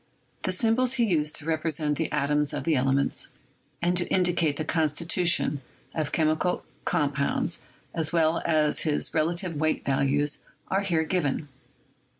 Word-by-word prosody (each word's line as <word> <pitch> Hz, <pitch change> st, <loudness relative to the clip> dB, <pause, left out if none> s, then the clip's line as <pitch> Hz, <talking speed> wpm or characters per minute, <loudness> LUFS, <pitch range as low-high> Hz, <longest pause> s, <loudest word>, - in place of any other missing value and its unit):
The -, -, +1 dB
symbols 245 Hz, +1 st, +3 dB
he 250 Hz, -3 st, +1 dB
used 155 Hz, -6 st, +1 dB
to 150 Hz, -, -3 dB
represent 155 Hz, -2 st, -1 dB
the 160 Hz, -, -1 dB
atoms 150 Hz, 0 st, +1 dB
of -, -, -3 dB
the 165 Hz, -2 st, +2 dB
ele 135 Hz, 0 st, +2 dB
ments 140 Hz, 0 st, -1 dB, 0.6 s
and 175 Hz, +1 st, +2 dB
to 175 Hz, -, 0 dB
indicate 175 Hz, -5 st, +1 dB
the 155 Hz, -, -3 dB
constitution 160 Hz, -1 st, +1 dB, 0.3 s
of 155 Hz, -2 st, -2 dB
chemical 155 Hz, +2 st, 0 dB, 0.2 s
com 145 Hz, -1 st, +1 dB
pounds, 140 Hz, +4 st, -1 dB, 0.3 s
as 160 Hz, -2 st, 0 dB
well 165 Hz, -1 st, +2 dB
as 155 Hz, -2 st, +2 dB
his 150 Hz, -2 st, 0 dB
relative 170 Hz, +1 st, 0 dB
weight 155 Hz, +1 st, 0 dB
values, 140 Hz, +2 st, +1 dB, 0.3 s
are 195 Hz, -, +1 dB
here 170 Hz, -5 st, +1 dB
given. 155 Hz, -3 st, -1 dB
155 Hz, 155 wpm, -26 LUFS, 150-175 Hz, 0.6 s, symbols